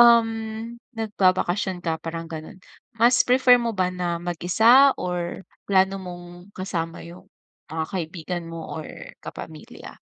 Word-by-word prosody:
um, 235 -1 +7 0.7
nagbabakasyon 190 -3 +1
ka 160 -1 -1
parang 165 0 -5
gano'n, 160 +1 -8 0.4
mas 240 +2 +5
prefer 250 -1 +6
mo 230 -3 -2
ba 180 -1 +1
na 175 -1 -2
mag-isa 220 +11 +5
or 180 +1 -3 0.2
plano 190 0 +3
mong 175 0 -10
kasama 170 -4 -4
yung 170 +2 -12 0.4
mga 160 0 -2
kaibigan 175 0 -4
mo 165 0 -7
or - - -8 0.3
kapamilya? 155 -1 -10
180 Hz, 125 wpm, -24 LUFS, 170-205 Hz, 0.7 s, um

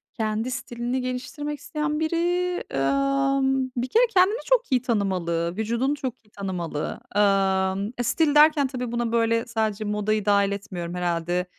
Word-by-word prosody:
Kendi 220 +3 -1
stilini 245 +1 -3
geliştirmek 285 +4 -4
isteyen 300 +1 -2
biri, 320 +1 0 0.6
ımm, 275 - +1
bir 245 - 0
kere 465 - +4
kendini 380 +4 +4
çok - - +2
iyi 255 -2 +3
tanımalı, 180 -8 -1
vücudunu 235 +6 0
çok 260 -4 -4
iyi - - -26
tanımalı. 180 -7 -4 0.2
Imm, 195 0 +2
e, 245 - -1
stil 295 +4 +2
derken 300 -2 +6
tabii 250 -2 -4
buna 235 -1 -1
böyle 230 0 +2
sadece 220 -2 -1
modayı 210 0 0
dahil 200 -1 +3
etmiyorum. 185 -4 -5
Herhâlde, 175 0 -1
230 Hz, 145 wpm, -25 LUFS, 195-275 Hz, 0.6 s, derken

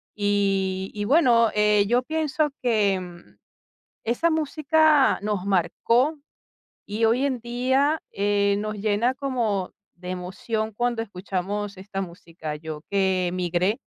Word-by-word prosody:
Y 195 -2 0
y 205 0 -2
bueno, 235 -5 +4
eh, 210 -1 +3
yo 240 +2 +3
pienso 310 +1 0
que 210 -5 +2 1.1
esa 240 +9 +1
música 310 -1 +3
nos 205 -2 -2
marcó 230 - +1 0.7
y 215 +3 -2
hoy 245 +5 +2
en 260 -3 -1
día, 260 +6 +1
eh, 200 0 +2
nos 215 0 -3
llena 215 +4 +1
como 240 -9 -2 0.2
de 180 +1 -9
emoción 215 +5 -3
cuando 240 +1 -1
escuchamos 200 0 -4
esta 195 0 -6
música. 170 -4 -6
Yo 155 0 -7
que 190 -2 +1
migré, 180 +4 0
210 Hz, 120 wpm, -24 LUFS, 190-250 Hz, 1.1 s, bueno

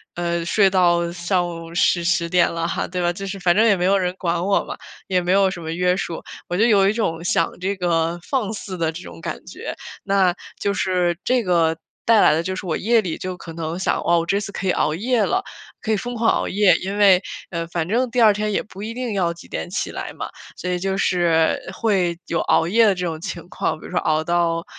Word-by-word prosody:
呃， 170 -1 -1
睡 195 +3 +3
到 175 -2 +3
上 175 +1 0
午 165 -1 -8
10- 175 0 +2
10 170 0 +1
点 175 -1 +3
了 165 0 -1
哈“， - - -2
对 180 0 -3
吧？ 175 0 +1
就 195 +3 -6
是 195 0 -5
反 175 -1 +3
正 220 +3 +5
也 205 -4 +4
没 180 - 0
有 195 +2 +4
人 180 -1 -1
管 170 0 -1
我 200 - +2
嘛， - - -6 0.3
也 185 -1 +1
没 180 +1 -1
有 195 0 +4
什 180 -2 -6
么 160 0 -5
约 180 +2 +1
束， 170 -3 -4 0.3
我 175 - -1
就 220 - +4
有 200 -4 +5
一 - - +3
种 170 -7 -2
想 - - +1
这 195 +2 -1
个 170 -1 0
放 220 0 -1
肆 195 -3 -6
的 165 -2 0
这 170 +2 -8
种 85 -1 -11
感 - - -4
觉。 - - -6 0.3
那 195 -3 +2 0.2
就 200 - 0
是 180 -3 0
这 250 -1 +2
个 165 -2 +2 0.3
带 225 -2 +5
来 - - +6
的 160 - +1
就 185 +2 -3
是 190 - -6
我 165 - -1
夜 230 +1 +3
里 175 -5 -4
就 185 0 -5
可 165 - -9
能 165 0 -4
想： - - 0
“哦， 170 0 +3
我 165 - -2
这 195 +3 +1
次 205 - -5
可 195 - -5
以 - - +4
熬 155 - +1
夜 235 +5 +1
了， 380 +1 0 0.4
可 220 - -2
以 215 - +2
疯 245 +4 -5
狂 225 0 +2
熬 - - 0
夜， 200 -1 +4
因 195 +2 -4
为， 195 -3 +6 0.3
嗯， 170 -1 -4
反 170 -1 -2
正 240 +6 +1
第 245 +1 +1
二 220 -2 +7
天 210 +1 -2
也 - - 0
不 200 -2 -12
一 220 +2 -4
定 250 -1 -3
要 175 -3 0
几 170 - -15
点 175 - -4
起 190 - -3
来 - - -6
嘛。 - - -6 0.3
“所 180 - -5
以 180 - -1
就 195 +1 -1
是 170 -4 +2
会 185 -6 0
有 165 - -1
熬 - - +2
夜 225 +6 +4
的 200 -3 +4
这 180 - -3
种 160 -2 -3
情 170 -2 -6
况， - - -2
比 - - -13
如 - - -9
说 - - +1
熬 155 0 +1
到 170 0 0
180 Hz, 270 characters per minute, -21 LUFS, 170-200 Hz, 0.4 s, 二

